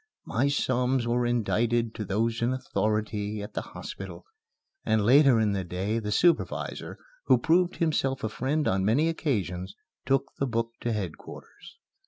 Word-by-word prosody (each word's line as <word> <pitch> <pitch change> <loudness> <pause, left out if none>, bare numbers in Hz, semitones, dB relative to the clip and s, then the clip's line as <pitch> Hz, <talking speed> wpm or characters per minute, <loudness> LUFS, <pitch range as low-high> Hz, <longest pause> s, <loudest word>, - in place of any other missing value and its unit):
My 130 +5 +1
psalms 130 -3 +1
were 120 0 +1
indited 120 0 +1
to 110 - -4
those 115 +4 -1
in 120 +2 +1
authority 105 -4 -2
at 105 - -9
the - - -2
hospital, - - -8 0.6
and 110 -2 +1
later 135 0 +6
in 110 -2 +2
the 95 -1 -1
day 95 +6 -2
the 105 -2 -4
supervisor 170 +10 0 0.3
who - - +5
proved 175 +2 +2
himself 140 -5 0
a 110 - 0
friend 145 +7 -1
on 95 0 +1
many 135 +11 +3
occasions 95 - -2 0.3
took 135 0 +1
the 140 - +1
book 115 -1 -1
to 120 - -2
headquarters. 105 - -7
115 Hz, 155 wpm, -27 LUFS, 105-135 Hz, 0.6 s, later